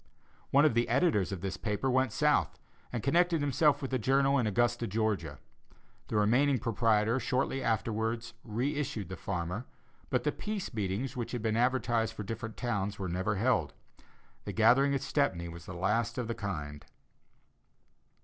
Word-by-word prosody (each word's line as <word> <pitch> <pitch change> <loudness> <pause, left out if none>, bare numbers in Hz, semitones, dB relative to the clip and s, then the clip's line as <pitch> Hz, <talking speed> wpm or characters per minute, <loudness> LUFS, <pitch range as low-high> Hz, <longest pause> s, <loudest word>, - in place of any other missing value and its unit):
One 140 +2 +5
of 150 - +4
the 120 +1 +1
editors 125 - +2
of 95 -3 -4
this 95 0 -3
paper 105 +4 -2
went 130 -1 +2
South, 150 - +2 0.3
and 120 -3 -3
connected 170 +3 +3
himself 145 +1 +2
with 135 - -4
a 130 - +2
journal 135 +4 +3
in 115 - +1
Augusta, 120 +3 +1
Georgia; 100 -8 -1 0.7
the - - -4
remaining 125 +7 +3
proprietor 115 0 +2
shortly 130 +2 -1
afterwards 115 0 -1
re 120 +6 -1
issued 110 - -3
the 95 - -5
Farmer, 90 +5 -4 0.4
but - - +1
the - - +1
peace 210 -7 -5
meetings 110 +5 -2
which 120 -1 -4
had 120 -3 -3
been 110 -1 +1
advertised 120 -2 +1
for 105 - -5
different 110 +2 -6
towns 105 -4 -2
were 95 -3 -4
never 95 +4 -1
held; 105 - +1 0.7
the - - -5
gathering 135 +5 +4
at 135 - -1
Stepney 90 - 0
was 85 0 -10
the 90 - -7
last 105 +7 0
of 125 -3 -2
the 115 - -1
kind. 75 -10 -5
115 Hz, 170 wpm, -31 LUFS, 100-130 Hz, 0.7 s, One